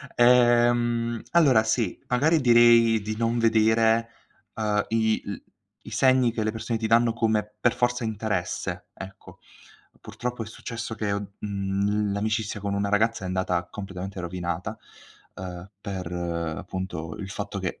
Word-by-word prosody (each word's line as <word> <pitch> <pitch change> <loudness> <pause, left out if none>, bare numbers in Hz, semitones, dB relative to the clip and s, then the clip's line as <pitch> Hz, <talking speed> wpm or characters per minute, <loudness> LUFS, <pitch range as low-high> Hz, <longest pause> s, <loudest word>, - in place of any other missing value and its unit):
Ehm, 120 -1 +3
allora, 140 -10 +5
sì, 110 -3 -1
magari 150 +6 +3
direi 120 -3 +5
di 110 +1 -4
non 115 +1 0
vedere, 115 0 +3 0.5
uhm, 105 -2 0
i 110 -1 +1
l - - -6 0.4
i - - -9
segni 130 -2 +3
che 110 -1 -2
le 110 - 0
persone 110 +1 -3
ti 110 - -1
danno 115 +1 +4
come 110 -2 +1 0.2
per 120 - +2
forza 120 0 0
interesse, 110 -4 -3
ecco. 95 0 -11 0.6
Purtroppo 125 -1 -5
è 110 - -7
successo 115 +1 -6
che 105 -2 -1
o 100 0 -2
mhmm, 100 +1 -1
l'amicizia 110 +1 -1
con 100 0 -2
una 100 0 0
ragazza 110 +1 +1
è - - -3
andata 90 -1 0
completamente 95 -1 -7
rovinata, 85 0 -4 0.6
uhm, 90 0 -8
per, 95 -4 -5
appunto, 85 0 -4
il 100 -1 -6
fatto 100 0 -5
che, 90 - -4
110 Hz, 145 wpm, -25 LUFS, 100-115 Hz, 0.6 s, allora